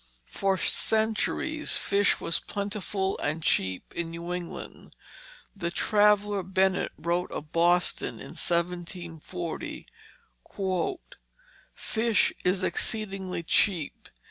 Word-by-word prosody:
For 195 Hz, -1 st, +1 dB
centuries, 220 Hz, -, +1 dB
fish 200 Hz, 0 st, +2 dB
was 165 Hz, -, +2 dB
plentiful 200 Hz, -1 st, -2 dB
and 155 Hz, +2 st, -2 dB
cheap 95 Hz, -8 st, 0 dB
in 170 Hz, -1 st, -2 dB
New 170 Hz, +1 st, -5 dB
England. 180 Hz, -1 st, -7 dB, 0.6 s
The 170 Hz, -4 st, -2 dB
traveller 205 Hz, +2 st, +3 dB
Bennet 190 Hz, +1 st, +1 dB
wrote 170 Hz, +3 st, -1 dB
of 150 Hz, +1 st, -6 dB
Boston, 175 Hz, +1 st, +2 dB
in -, -, -9 dB
1740: 170 Hz, -1 st, -3 dB, 1.9 s
"Fish 225 Hz, -2 st, +1 dB
is 185 Hz, +1 st, +2 dB
exceedingly 195 Hz, -4 st, -1 dB
cheap. 170 Hz, -2 st, +1 dB
185 Hz, 90 wpm, -28 LUFS, 170-205 Hz, 1.9 s, traveller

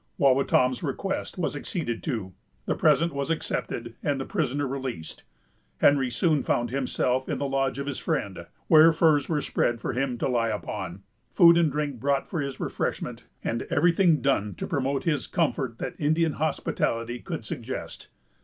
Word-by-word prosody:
Wawatam's 130 Hz, -2 st, +3 dB
request 175 Hz, +8 st, -3 dB
was 170 Hz, -4 st, -1 dB
acceded 145 Hz, -, -3 dB
to, 110 Hz, -, -3 dB, 0.3 s
the -, -, +1 dB
present 170 Hz, 0 st, +3 dB
was 140 Hz, +1 st, -2 dB
accepted, 120 Hz, -7 st, -3 dB
and 145 Hz, -2 st, 0 dB
the 135 Hz, -, -3 dB
prisoner 145 Hz, -6 st, -1 dB
released. 130 Hz, -11 st, -5 dB, 0.6 s
Henry 140 Hz, -3 st, +4 dB
soon 150 Hz, +4 st, +2 dB
found 120 Hz, -1 st, 0 dB
himself 130 Hz, -1 st, 0 dB
in -, -, -1 dB
the 140 Hz, -, -2 dB
lodge 135 Hz, -1 st, 0 dB
of 140 Hz, -, -3 dB
his 140 Hz, -2 st, -4 dB
friend, 95 Hz, -4 st, -3 dB, 0.2 s
where 160 Hz, +1 st, +7 dB
furs 155 Hz, -3 st, +3 dB
were 155 Hz, -3 st, +1 dB
spread 120 Hz, -3 st, 0 dB
for -, -, -3 dB
him 125 Hz, 0 st, -1 dB
to -, -, -1 dB
lie 120 Hz, -3 st, +1 dB
upon, 95 Hz, -2 st, -5 dB, 0.3 s
food 170 Hz, -2 st, +8 dB
and 165 Hz, -3 st, +3 dB
drink 145 Hz, -3 st, -2 dB
brought 140 Hz, +2 st, 0 dB
for 170 Hz, -6 st, -2 dB
his 140 Hz, -2 st, -5 dB
refreshment, -, -, -3 dB, 0.2 s
and 115 Hz, -, -1 dB
every 175 Hz, -, +4 dB
thing 170 Hz, -3 st, +3 dB
done 105 Hz, -8 st, +1 dB
to -, -, -4 dB
promote 135 Hz, -2 st, -1 dB
his 150 Hz, -5 st, 0 dB
comfort 135 Hz, -8 st, -1 dB
that -, -, -4 dB
Indian 160 Hz, +2 st, +2 dB
hospitality 120 Hz, -5 st, -1 dB
could -, -, -6 dB
suggest. -, -, -6 dB
140 Hz, 170 wpm, -26 LUFS, 120-155 Hz, 0.6 s, food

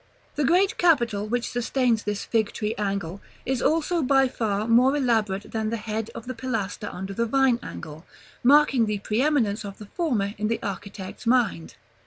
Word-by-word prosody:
The 295 Hz, -, -1 dB
great 360 Hz, +7 st, +2 dB
capital, 235 Hz, -12 st, +2 dB
which 240 Hz, +2 st, -2 dB
sustains 245 Hz, -1 st, +1 dB
this 210 Hz, -1 st, -2 dB
Fig 220 Hz, -3 st, 0 dB
tree 215 Hz, 0 st, -2 dB
angle, 195 Hz, -3 st, -3 dB, 0.2 s
is 260 Hz, -2 st, -1 dB
also 330 Hz, +2 st, +1 dB
by 270 Hz, -1 st, +4 dB
far 215 Hz, -3 st, -2 dB
more 250 Hz, +5 st, +4 dB
elaborate 220 Hz, -7 st, 0 dB
than 220 Hz, -1 st, -1 dB
the 230 Hz, -, -2 dB
head 220 Hz, 0 st, -4 dB
of 230 Hz, -, -7 dB
the 255 Hz, -, -4 dB
pilaster 220 Hz, -5 st, -3 dB
under 190 Hz, +2 st, -6 dB
the 230 Hz, +3 st, -1 dB
Vine 265 Hz, -1 st, +3 dB
angle, 155 Hz, -7 st, -8 dB, 0.4 s
marking 270 Hz, -3 st, +5 dB
the 210 Hz, -1 st, -1 dB
preëminence 220 Hz, 0 st, 0 dB
of 200 Hz, -1 st, -8 dB
the 210 Hz, -, -10 dB
former 215 Hz, -, -1 dB
in 215 Hz, -, 0 dB
the 230 Hz, +1 st, 0 dB
architect's 200 Hz, +2 st, -6 dB
mind. 230 Hz, -9 st, +1 dB
225 Hz, 175 wpm, -25 LUFS, 205-260 Hz, 0.4 s, marking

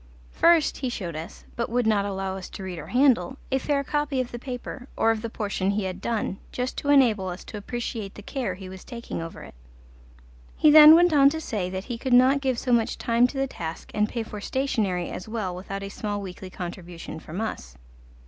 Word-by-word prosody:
First 335 Hz, -2 st, +4 dB
he 260 Hz, -, -2 dB
showed 180 Hz, -9 st, -5 dB
us, 160 Hz, +5 st, -8 dB
but 235 Hz, -, -2 dB
would 245 Hz, +1 st, +1 dB
not 210 Hz, -2 st, +2 dB
allow 195 Hz, -1 st, -3 dB
us 190 Hz, -1 st, -7 dB
to 195 Hz, -, -8 dB
read 180 Hz, -3 st, -5 dB
or 155 Hz, -, -8 dB
handle, 260 Hz, -, +3 dB
a 265 Hz, -, +2 dB
fair 280 Hz, +1 st, 0 dB
copy 295 Hz, -1 st, -1 dB
of 255 Hz, -1 st, -2 dB
the 240 Hz, -, -6 dB
paper, 250 Hz, 0 st, -7 dB
or 225 Hz, -, +4 dB
of 220 Hz, -1 st, -2 dB
the 230 Hz, -, -4 dB
portion 200 Hz, -3 st, -2 dB
he 205 Hz, +1 st, 0 dB
had 190 Hz, 0 st, -4 dB
done, 215 Hz, -3 st, -2 dB
just 250 Hz, +1 st, -3 dB
to 285 Hz, -, -3 dB
enable 235 Hz, -9 st, +4 dB
us 180 Hz, 0 st, -6 dB
to 215 Hz, -, -8 dB
appreciate 220 Hz, -2 st, -5 dB
the 210 Hz, -, -10 dB
care 235 Hz, -6 st, -3 dB
he 190 Hz, 0 st, -9 dB
was 185 Hz, 0 st, -10 dB
taking 235 Hz, -8 st, -6 dB
over 165 Hz, 0 st, -8 dB
it. -, -, -12 dB, 1.0 s
He 305 Hz, -, +6 dB
then 305 Hz, +1 st, +11 dB
went 350 Hz, 0 st, +5 dB
on 280 Hz, -2 st, +7 dB
to 320 Hz, +2 st, -3 dB
say 210 Hz, -, -3 dB
that 190 Hz, 0 st, -4 dB
he 235 Hz, 0 st, -5 dB
could 260 Hz, 0 st, -1 dB
not 260 Hz, +3 st, +6 dB
give 260 Hz, -3 st, 0 dB
so 250 Hz, -, -2 dB
much 230 Hz, -2 st, +2 dB
time 235 Hz, +1 st, +3 dB
to 270 Hz, -, -8 dB
the 270 Hz, -, +1 dB
task 165 Hz, -10 st, -7 dB
and 210 Hz, 0 st, +1 dB
pay 230 Hz, -, -3 dB
for 210 Hz, -1 st, -8 dB
stationery 210 Hz, -9 st, -1 dB
as 185 Hz, -, -7 dB
well 210 Hz, -6 st, -3 dB
without 195 Hz, +2 st, -6 dB
a 195 Hz, -, -5 dB
small 205 Hz, 0 st, -3 dB
weekly 190 Hz, -1 st, -8 dB
contribution 175 Hz, -2 st, -7 dB
from 160 Hz, +4 st, -7 dB
us. 65 Hz, -, -5 dB
220 Hz, 225 wpm, -25 LUFS, 190-260 Hz, 1.0 s, then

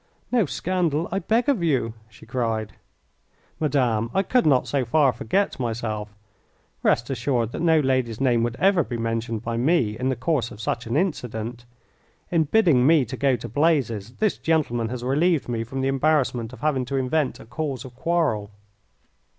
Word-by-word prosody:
"No 235 Hz, -8 st, +3 dB
scandal, 170 Hz, -2 st, -1 dB
I 195 Hz, -, 0 dB
beg 225 Hz, -, +1 dB
of 275 Hz, -10 st, +2 dB
you," 135 Hz, -9 st, +1 dB, 0.2 s
she 110 Hz, -, -16 dB
cried. 110 Hz, -4 st, -2 dB, 0.9 s
"Madame, 125 Hz, -7 st, +1 dB
I 195 Hz, -, +3 dB
could 245 Hz, -1 st, +2 dB
not 135 Hz, -4 st, +3 dB
so 140 Hz, -2 st, 0 dB
far 135 Hz, +2 st, +3 dB
forget 160 Hz, -, -1 dB
myself. 110 Hz, -3 st, -3 dB, 0.7 s
Rest 120 Hz, +4 st, +1 dB
assured 120 Hz, -2 st, 0 dB
that -, -, -5 dB
no 165 Hz, -2 st, +4 dB
lady's 130 Hz, -5 st, 0 dB
name 125 Hz, -3 st, +2 dB
would 120 Hz, 0 st, -1 dB
ever 190 Hz, +2 st, +3 dB
be 120 Hz, -3 st, -5 dB
mentioned 115 Hz, -1 st, -2 dB
by 115 Hz, 0 st, -2 dB
me 125 Hz, -5 st, +2 dB
in 125 Hz, +4 st, -1 dB
the 130 Hz, -, 0 dB
course 125 Hz, -2 st, 0 dB
of 105 Hz, -, -12 dB
such 115 Hz, +1 st, -3 dB
an 120 Hz, +5 st, 0 dB
incident. 120 Hz, -, -3 dB, 0.7 s
In 165 Hz, -2 st, +3 dB
bidding 155 Hz, -, +4 dB
me 155 Hz, -4 st, +5 dB
to 125 Hz, +3 st, -6 dB
go 135 Hz, 0 st, +2 dB
to 120 Hz, 0 st, -7 dB
blazes 120 Hz, -5 st, 0 dB
this 215 Hz, -2 st, 0 dB
gentleman 120 Hz, -8 st, 0 dB
has 125 Hz, 0 st, -5 dB
relieved 150 Hz, +5 st, +1 dB
me 115 Hz, -2 st, -2 dB
from 130 Hz, +4 st, -5 dB
the 135 Hz, -, 0 dB
embarrassment 135 Hz, -4 st, +1 dB
of 130 Hz, -, -12 dB
having 150 Hz, -4 st, +1 dB
to 135 Hz, +3 st, -4 dB
invent 135 Hz, +2 st, 0 dB
a -, -, -12 dB
cause 130 Hz, +1 st, -4 dB
of 130 Hz, -, -10 dB
quarrel." 140 Hz, -9 st, 0 dB
130 Hz, 180 wpm, -24 LUFS, 115-155 Hz, 0.9 s, me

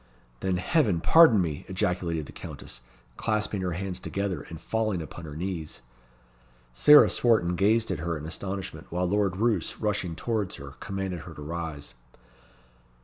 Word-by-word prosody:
"Then 95 Hz, -1 st, 0 dB
Heaven 105 Hz, -, +2 dB
pardon 145 Hz, -, +7 dB
me!" 75 Hz, -4 st, -4 dB
ejaculated 90 Hz, -4 st, -1 dB
the -, -, -11 dB
Countess, -, -, -8 dB, 0.4 s
clasping 105 Hz, -2 st, -1 dB
her 90 Hz, -2 st, -1 dB
hands 95 Hz, +1 st, -4 dB
together, 100 Hz, -2 st, -3 dB
and 80 Hz, -, -8 dB
falling 110 Hz, -1 st, -1 dB
upon 85 Hz, +1 st, -8 dB
her 75 Hz, -2 st, -8 dB
knees. 80 Hz, -6 st, -5 dB, 0.9 s
Sarah 150 Hz, -, +8 dB
Swarton 110 Hz, -8 st, +2 dB
gazed 110 Hz, +5 st, +2 dB
at -, -, -2 dB
her 85 Hz, 0 st, -2 dB
in 75 Hz, -, -8 dB
astonishment; 95 Hz, +3 st, -5 dB
while 90 Hz, +2 st, -1 dB
Lord 100 Hz, 0 st, +1 dB
Roos, 115 Hz, +1 st, 0 dB
rushing 100 Hz, -6 st, -1 dB
towards 110 Hz, -1 st, -2 dB
her, 70 Hz, 0 st, -9 dB
commanded 95 Hz, -3 st, -4 dB
her 80 Hz, 0 st, -10 dB
to 75 Hz, -, -8 dB
rise. 80 Hz, -2 st, -5 dB
90 Hz, 150 wpm, -27 LUFS, 85-105 Hz, 0.9 s, Sarah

